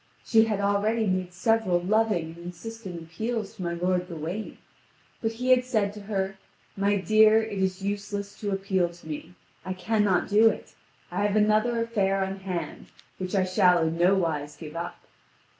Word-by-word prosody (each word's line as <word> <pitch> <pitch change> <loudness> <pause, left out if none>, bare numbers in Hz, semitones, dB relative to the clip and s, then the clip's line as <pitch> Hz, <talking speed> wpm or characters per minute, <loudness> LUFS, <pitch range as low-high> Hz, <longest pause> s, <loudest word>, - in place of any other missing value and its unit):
She 225 -2 +5
had 215 -3 -1
already 205 +3 +1
made 185 -2 -1
several 185 -1 +2
loving 190 -3 +1
and - - -16
insistent 180 +2 -7
appeals 220 +7 -4
to 220 - -10
my 170 -1 -2
lord 180 +1 0
Gawain; 170 +6 -5 0.6
but 225 -1 -1
he 250 +3 0
had 255 0 +6
said 215 -5 0
to 210 - -9
her: 195 -1 -3 0.4
"My 200 +1 +2
dear, 215 +2 +5
it 210 -3 -4
is 190 0 -1
useless 200 0 -3
to 205 - -3
appeal 195 -2 0
to 170 -1 -15
me; 160 +3 -7 0.3
I 185 - -3
cannot 190 0 +1
do 215 +2 +6
it; - - -6 0.4
I - - -1
have 205 - -1
another 215 +3 +3
affair 195 -4 +1
on 190 0 -5
hand, 180 -5 -5 0.3
which 185 +1 -3
I 190 -1 +3
shall 180 -2 +4
in 160 - -2
no 180 +3 +5
wise 150 -5 -1
give 155 -1 -9
up." 170 +1 -4
195 Hz, 175 wpm, -27 LUFS, 180-215 Hz, 0.6 s, had